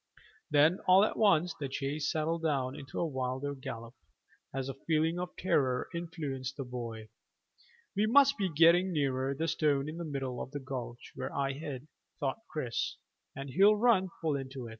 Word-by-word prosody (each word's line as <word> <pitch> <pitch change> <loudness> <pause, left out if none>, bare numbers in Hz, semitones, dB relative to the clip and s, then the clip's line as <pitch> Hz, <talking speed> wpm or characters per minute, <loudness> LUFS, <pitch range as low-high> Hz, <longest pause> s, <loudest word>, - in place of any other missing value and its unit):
Then 150 +4 +4
all 185 +2 +7
at - - -2
once 180 -5 +3
the 140 -2 -3
chase 140 +2 -2
settled 160 +1 -1
down 135 -5 0
into 135 -1 -7
a - - +1
wilder 130 -1 -2
gallop, 115 -3 -7 0.6
as 135 0 -3
a 135 - -3
feeling 160 +4 0
of 180 0 -5
terror 130 -8 +1
influenced 150 -6 -4
the 135 - -3
boy. 115 -3 -6 0.9
"We 210 +2 +2
must 280 +4 +6
be 195 -6 0
getting 170 +4 +5
nearer 135 -3 0
the 160 +4 -1
stone 145 -3 +1
in 155 +2 -5
the 170 - -4
middle 135 -5 -3
of - - -5
the 145 - -3
gulch 125 -3 -6
where - - -5
I 135 -1 -1
hid," 145 -1 -6 0.3
thought 135 +4 -1
Chris, 125 -7 -2 0.4
"and 135 0 -6
he'll 200 +7 +6
run 210 -4 +3
full 155 -3 +1
into 135 -2 -5
it." - - -7
145 Hz, 180 wpm, -31 LUFS, 130-170 Hz, 0.9 s, all